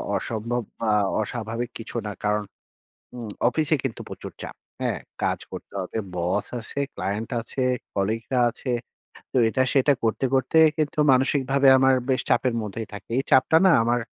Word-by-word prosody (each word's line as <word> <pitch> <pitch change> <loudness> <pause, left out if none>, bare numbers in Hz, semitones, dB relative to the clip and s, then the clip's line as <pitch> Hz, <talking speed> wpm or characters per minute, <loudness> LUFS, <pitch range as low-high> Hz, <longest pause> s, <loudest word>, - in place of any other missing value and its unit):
অসম্ভব 115 +2 -2 0.2
বা 115 - 0 0.3
অস্বাভাবিক 115 +2 -4
কিছু 115 +1 -9
না। 105 - -3
কারণ 105 0 +1 0.7
উম 115 -3 -6 0.2
অফিসে 155 +4 +2
কিন্তু 135 -4 -3
প্রচুর - - -8
চাপ, - - -7 0.3
হ্যাঁ? - - -1 0.2
কাজ - - +1
করতে - - -9
হবে। 95 +4 -5 0.2
বস 90 +4 0
আছে, 115 +5 -3
ক্লায়েন্ট 100 +4 -3
আছে, 130 +3 -4 0.3
কলিগরা 110 +6 -1
আছে। 130 - -6 0.6
তো, - - 0
এটা-সেটা 130 +3 +3
করতে, 115 +4 +1
করতে 135 +4 +2 0.2
কিন্তু 155 -1 -1
মানসিকভাবে 135 +1 +3
আমার 130 0 +5 0.2
বেশ 130 - +2
চাপের 125 -2 +2
মধ্যেই 105 +1 -5
থাকে। 105 - -9
এই 135 - +1
চাপটা 130 +5 +5
না 190 - +7
আমার, 120 +1 +2
120 Hz, 155 wpm, -24 LUFS, 110-135 Hz, 0.7 s, না